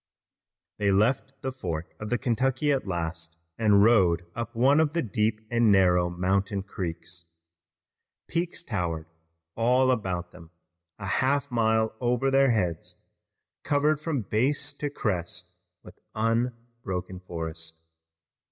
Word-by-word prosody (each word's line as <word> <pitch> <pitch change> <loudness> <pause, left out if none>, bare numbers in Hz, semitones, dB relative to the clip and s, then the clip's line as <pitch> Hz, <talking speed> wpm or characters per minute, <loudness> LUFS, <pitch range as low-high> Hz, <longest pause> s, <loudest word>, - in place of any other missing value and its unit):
They 100 -1 +2
left 130 +7 +1
the 130 - -1
fork 85 -10 -5
of 105 - -5
the 120 - +1
Kentucky 130 +3 +1
at 135 -6 0
last 80 -2 -4 0.2
and 105 -3 +5
rowed 90 -7 +4
up 115 0 -5
one 135 +6 +4
of 155 -2 +2
the 170 -1 0
deep 110 0 0
and 115 -2 +4
narrow 90 -3 +4
mountain 95 +3 0
creeks. 85 -3 -6 1.0
Peaks 170 0 -2
towered 85 - -2 0.5
all 125 +3 +3
about 90 -7 -2
them, 85 -2 -14 0.5
a 105 - -7
half 140 +7 +1
mile 110 -1 +2
over 125 +2 +1
their 135 0 +5
heads, 90 -8 -1 0.7
covered 145 +1 +2
from 155 -7 -1
base 135 +8 0
to 145 0 -3
crest 90 -7 -3 0.3
with - - -14 0.2
unbroken 115 -5 -2
forest. 80 -2 -6
110 Hz, 125 wpm, -27 LUFS, 90-130 Hz, 1.0 s, and